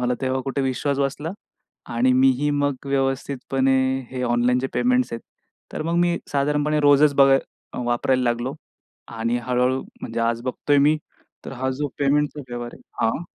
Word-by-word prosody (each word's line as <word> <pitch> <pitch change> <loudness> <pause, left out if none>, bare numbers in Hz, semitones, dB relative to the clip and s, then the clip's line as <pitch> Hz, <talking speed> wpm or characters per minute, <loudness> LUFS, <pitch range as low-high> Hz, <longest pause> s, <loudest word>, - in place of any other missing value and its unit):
मला 125 0 +1
तेव्हा 130 0 0
कुठे 135 +1 -2
विश्वास 135 +2 -1
बसला. 145 +3 -2 0.6
आणि 125 +2 +3
मीही 130 +2 +3
मग 145 -1 +1
व्यवस्थितपणे 135 -1 0 0.4
हे 130 -1 -4
ऑनलाईनचे 125 +2 +2
पेमेंट्स 250 - +1
आहेत. 115 - -5 0.5
तर - - -3
मग 165 +1 -1
मी 175 0 +2
साधारणपणे 150 +2 +1
रोजच 145 +1 +5
बघाय 135 -1 +6 0.5
वापरायला 125 +2 +1
लागलो. 120 +2 -1 0.5
आणि 115 +1 -2
हळू-हळू 125 +2 0 0.2
म्हणजे 115 +1 -4
आज 115 0 0
बघतोय 145 +3 0
मी 155 +1 +3 0.5
तर - - -6
हा 130 - +1
जो 150 - 0
पेमेंटचा 145 +1 +1
व्यवहार 120 0 -6
आहे, - - -17 0.2
हां. 115 +9 0
135 Hz, 155 wpm, -23 LUFS, 125-145 Hz, 0.6 s, बघाय